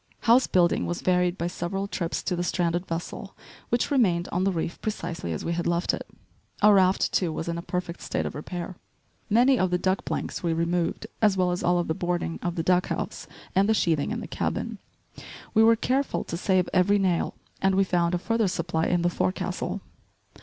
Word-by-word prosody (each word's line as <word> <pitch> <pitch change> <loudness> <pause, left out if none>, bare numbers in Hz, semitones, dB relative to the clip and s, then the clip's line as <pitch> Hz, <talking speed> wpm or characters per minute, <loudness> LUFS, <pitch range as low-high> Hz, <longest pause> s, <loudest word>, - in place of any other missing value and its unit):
House 240 +3 +5
building 175 -2 +2
was 175 - -3
varied 180 0 +2
by 170 - -2
several 185 +3 -3
trips 175 -4 -3
to 180 - -1
the 175 - -2
stranded 175 0 0
vessel 170 +3 -5 0.3
which 240 +5 0
remained 185 -11 +2
on 185 +2 0
the 195 - +3
reef 165 -1 -3
precisely 170 - -4
as 80 - -4
we 170 - 0
had 170 0 -2
left 170 0 +1
it. - - -5 0.6
Our 210 0 +8
raft, 190 -1 +3
too, 180 -4 +1
was 160 +1 -4
in 170 - -1
a - - -4
perfect 180 -1 -4
state - - -2
of - - -4
repair. 175 +4 -6 0.5
Many 245 +4 +4
of 185 - +2
the 180 - +1
deck 185 +1 0
planks - - -3
we 170 -2 0
removed, 170 +4 -1 0.2
as 210 -3 +4
well 180 -1 +2
as 180 - -2
all 175 0 +2
the 160 - -1
boarding 175 0 -2
of 175 -1 -2
the 165 - -1
deck 180 +1 +3
house - - -4 0.3
and 195 +2 +3
the 220 - +4
sheathing 160 -7 +1
in - - -3
the - - -6
cabin. - - -3 0.7
We 220 - +5
were 225 +1 +7
careful 265 +5 0
to - - -5
save 185 +1 +1
every 190 +2 +4
nail, 185 -4 0 0.3
and 190 0 +3
we 195 - +4
found 175 -2 +1
a - - +2
further 225 +4 0
supply 170 -2 -1
in 175 -1 +1
the 175 - +3
fore 185 - +1
castle. - - -4
180 Hz, 210 wpm, -26 LUFS, 170-195 Hz, 0.7 s, Our